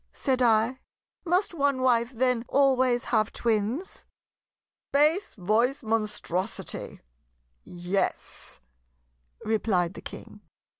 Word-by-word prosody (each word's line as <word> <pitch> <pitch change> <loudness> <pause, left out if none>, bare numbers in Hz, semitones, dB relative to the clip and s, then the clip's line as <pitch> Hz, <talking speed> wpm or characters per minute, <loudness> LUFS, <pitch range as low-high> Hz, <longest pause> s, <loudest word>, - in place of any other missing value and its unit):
said 260 -2 0
I. 230 +2 +3 0.5
"Must 360 +3 +1
one 280 -4 +1
wife 235 -2 +3
then 250 -1 0
always 260 -3 +3
have 215 -1 +2
twins?" 230 - -2 0.8
"Bass 305 +7 +2
voice 225 +8 +1
Monstrosity! 215 -3 -3 0.6
yes," 175 - -4 0.8
replied 195 -5 +1
the - - -10
King. - - -10
235 Hz, 90 wpm, -27 LUFS, 215-265 Hz, 0.8 s, I